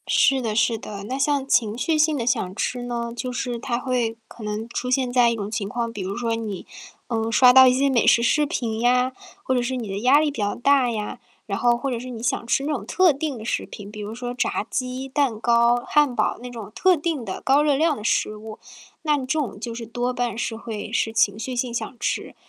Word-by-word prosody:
是 270 Hz, -1 st, +3 dB
的 220 Hz, -3 st, -2 dB
是 220 Hz, +1 st, +2 dB
的。 200 Hz, -2 st, -7 dB
那 255 Hz, +6 st, -4 dB
像 280 Hz, -1 st, +1 dB
情 230 Hz, -5 st, +2 dB
绪 320 Hz, +6 st, 0 dB
性 305 Hz, -1 st, +3 dB
地 235 Hz, -, -2 dB
想 190 Hz, -6 st, 0 dB
吃 245 Hz, +3 st, -2 dB
呢， 235 Hz, -1 st, -3 dB
就 250 Hz, +1 st, -4 dB
是 245 Hz, -1 st, -3 dB
它 235 Hz, 0 st, -2 dB
会 245 Hz, -3 st, -1 dB
可 230 Hz, -, -12 dB
能 210 Hz, +2 st, -4 dB
出 250 Hz, +1 st, -3 dB
现 255 Hz, -1 st, +1 dB
在 245 Hz, -2 st, +5 dB
一 235 Hz, -, 0 dB
种 205 Hz, -2 st, -4 dB
情 200 Hz, -2 st, -3 dB
况， 235 Hz, +1 st, -2 dB
比 210 Hz, -, -5 dB
如 190 Hz, +2 st, -4 dB
说 230 Hz, -1 st, -1 dB
你， 215 Hz, -5 st, -5 dB, 0.4 s
嗯， 225 Hz, -1 st, -1 dB
刷 250 Hz, +1 st, +7 dB
到 260 Hz, 0 st, +9 dB
一 250 Hz, -, +5 dB
些 270 Hz, +2 st, +2 dB
美 245 Hz, -4 st, +2 dB
食 235 Hz, -, +5 dB
视 300 Hz, +5 st, +3 dB
频 235 Hz, -7 st, -2 dB
呀 250 Hz, +1 st, +3 dB, 0.3 s
或 260 Hz, -, 0 dB
者 250 Hz, -, +2 dB
是 250 Hz, +2 st, -2 dB
你 240 Hz, -4 st, -4 dB
的 195 Hz, 0 st, -4 dB
压 255 Hz, +6 st, +5 dB
力 305 Hz, -1 st, +1 dB
比 280 Hz, -, -8 dB
较 205 Hz, 0 st, 0 dB
大 270 Hz, 0 st, +3 dB
呀。 210 Hz, -2 st, -4 dB, 0.3 s
然 200 Hz, -2 st, -2 dB
后 240 Hz, -1 st, +4 dB
或 270 Hz, +3 st, -3 dB
者 240 Hz, -, -2 dB
是 255 Hz, +2 st, -8 dB
你 230 Hz, -2 st, -7 dB
想 245 Hz, -1 st, -1 dB
吃 270 Hz, -, +1 dB
那 300 Hz, -, -1 dB
种 250 Hz, -9 st, -3 dB
特 365 Hz, -, +4 dB
定 285 Hz, -1 st, -3 dB
的 220 Hz, -, -8 dB
食 230 Hz, -, -2 dB
品， 205 Hz, -1 st, -10 dB
比 210 Hz, -, -9 dB
如 210 Hz, +2 st, -6 dB
说 245 Hz, 0 st, -5 dB
炸 245 Hz, -, -1 dB
鸡、 255 Hz, +1 st, -3 dB
蛋 265 Hz, -4 st, +1 dB
糕、 235 Hz, +1 st, +3 dB
汉 295 Hz, -4 st, +3 dB
堡 -, -, 0 dB
那 250 Hz, -, -7 dB
种 225 Hz, -4 st, -8 dB
特 370 Hz, +8 st, +4 dB
定 310 Hz, -5 st, -2 dB
的 190 Hz, -, -5 dB
高 275 Hz, +2 st, +4 dB
热 295 Hz, -2 st, +3 dB
量 310 Hz, 0 st, +2 dB
的 210 Hz, -, -8 dB
食 215 Hz, -2 st, +1 dB
物， 215 Hz, 0 st, -9 dB, 0.4 s
那 300 Hz, -2 st, +2 dB
这 265 Hz, -, -4 dB
种 240 Hz, -9 st, -3 dB
就 230 Hz, +1 st, -5 dB
是 230 Hz, 0 st, -6 dB
多 245 Hz, +3 st, -2 dB
半 245 Hz, -2 st, -2 dB
是 230 Hz, -1 st, -2 dB
会 220 Hz, -1 st, -6 dB
是 225 Hz, -, +1 dB
情 210 Hz, -2 st, +2 dB
绪 255 Hz, +3 st, -4 dB
性 245 Hz, -1 st, -2 dB
想 240 Hz, +1 st, -4 dB
吃， -, -, -2 dB
240 Hz, 270 characters per minute, -23 LUFS, 225-260 Hz, 0.4 s, 到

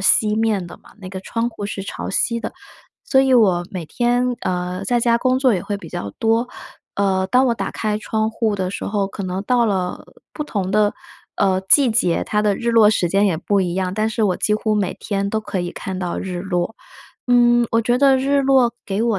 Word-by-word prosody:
西 210 Hz, +2 st, +3 dB
面 215 Hz, -4 st, 0 dB
的 175 Hz, -, -11 dB
嘛， -, -, -18 dB
那 190 Hz, -3 st, -9 dB
个 190 Hz, 0 st, -7 dB
窗 230 Hz, +4 st, -2 dB
户 205 Hz, -3 st, -6 dB
是 200 Hz, -1 st, -5 dB
朝 195 Hz, -, -6 dB
西 235 Hz, +4 st, 0 dB
的。 -, -, -5 dB, 0.5 s
所 265 Hz, -4 st, +3 dB
以 265 Hz, 0 st, +2 dB
我 190 Hz, -7 st, +3 dB
每 180 Hz, -3 st, -5 dB
天， 245 Hz, +6 st, 0 dB
呃， 180 Hz, +1 st, -3 dB
在 245 Hz, +2 st, +1 dB
家 235 Hz, 0 st, +2 dB
工 255 Hz, +1 st, +1 dB
作 260 Hz, -4 st, +3 dB
也 180 Hz, -, -2 dB
会 205 Hz, 0 st, -3 dB
比 180 Hz, -5 st, -11 dB
较 100 Hz, -, -5 dB
多， 225 Hz, +2 st, +1 dB, 0.5 s
呃， 190 Hz, -1 st, +1 dB
当 255 Hz, +6 st, +3 dB
我 240 Hz, -, +2 dB
打 -, -, -4 dB
开 215 Hz, -1 st, -2 dB
窗 220 Hz, 0 st, -1 dB
户 220 Hz, -2 st, -1 dB
的 185 Hz, -1 st, -2 dB
时 -, -, -5 dB
候， 200 Hz, -1 st, -1 dB
可 200 Hz, +1 st, -7 dB
能 185 Hz, +1 st, -3 dB
到 240 Hz, +1 st, +2 dB
了 185 Hz, -4 st, -2 dB, 0.3 s
不 300 Hz, -, -4 dB
同 200 Hz, -10 st, -3 dB
的， 210 Hz, 0 st, +2 dB, 0.4 s
呃， 190 Hz, -1 st, +2 dB
季 275 Hz, 0 st, +6 dB
节， 185 Hz, -7 st, +1 dB
它 210 Hz, 0 st, 0 dB
的 205 Hz, -2 st, +1 dB
日 235 Hz, -, -1 dB
落 225 Hz, -2 st, +6 dB
时 180 Hz, -5 st, +1 dB
间 195 Hz, +4 st, +2 dB
也 180 Hz, -5 st, +1 dB
不 200 Hz, +4 st, 0 dB
一 175 Hz, -2 st, -1 dB
样， 185 Hz, 0 st, -2 dB
但 215 Hz, +1 st, 0 dB
是 220 Hz, +1 st, -2 dB
我 185 Hz, -3 st, +1 dB
几 210 Hz, -, 0 dB
乎 215 Hz, 0 st, 0 dB
每 200 Hz, -3 st, -1 dB
天 200 Hz, -1 st, -2 dB
都 220 Hz, -, 0 dB
可 200 Hz, -3 st, -4 dB
以 175 Hz, 0 st, -3 dB
看 190 Hz, +1 st, -6 dB
到 180 Hz, -2 st, -3 dB
日 180 Hz, -2 st, -4 dB
落。 180 Hz, +2 st, -2 dB, 0.5 s
嗯， 240 Hz, -1 st, +4 dB
我 230 Hz, -, +3 dB
觉 240 Hz, +2 st, +1 dB
得 270 Hz, -1 st, +5 dB
日 280 Hz, +2 st, +2 dB
落 265 Hz, -3 st, +3 dB
给 200 Hz, +2 st, -2 dB
我 230 Hz, -4 st, +1 dB
210 Hz, 245 characters per minute, -20 LUFS, 190-235 Hz, 0.5 s, 季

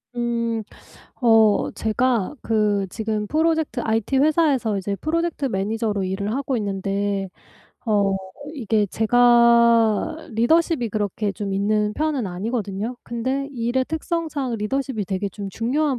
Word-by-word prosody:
음. 235 Hz, -2 st, -1 dB, 0.6 s
어 225 Hz, -3 st, +4 dB
제가 230 Hz, +1 st, 0 dB
그 210 Hz, -3 st, +1 dB
지금 215 Hz, -2 st, -2 dB
프로젝트 315 Hz, -3 st, 0 dB
IT 225 Hz, +4 st, 0 dB
회사에서 285 Hz, -8 st, +2 dB
이제 200 Hz, +1 st, -3 dB
프로젝트 325 Hz, -, -1 dB
매니저로 210 Hz, -1 st, -1 dB
일을 200 Hz, +3 st, -2 dB
하고 270 Hz, -2 st, -1 dB
있는데 200 Hz, -1 st, -2 dB, 0.6 s
어 200 Hz, -2 st, +2 dB, 0.4 s
이게 220 Hz, -5 st, +1 dB
제가 235 Hz, -, +4 dB
리더십이 245 Hz, -, +2 dB
그렇게 205 Hz, -1 st, -2 dB
좀 200 Hz, 0 st, -4 dB
있는 210 Hz, +1 st, +1 dB
편은 295 Hz, -8 st, -1 dB
아니거든요. 210 Hz, +4 st, -3 dB
근데 260 Hz, +4 st, -2 dB
일의 245 Hz, +2 st, 0 dB
특성상 310 Hz, -6 st, -2 dB
리더십이 225 Hz, 0 st, -2 dB
되게 195 Hz, +1 st, -2 dB
좀 200 Hz, +1 st, -7 dB
중요한 260 Hz, +6 st, 0 dB
225 Hz, 275 characters per minute, -22 LUFS, 205-260 Hz, 0.6 s, 어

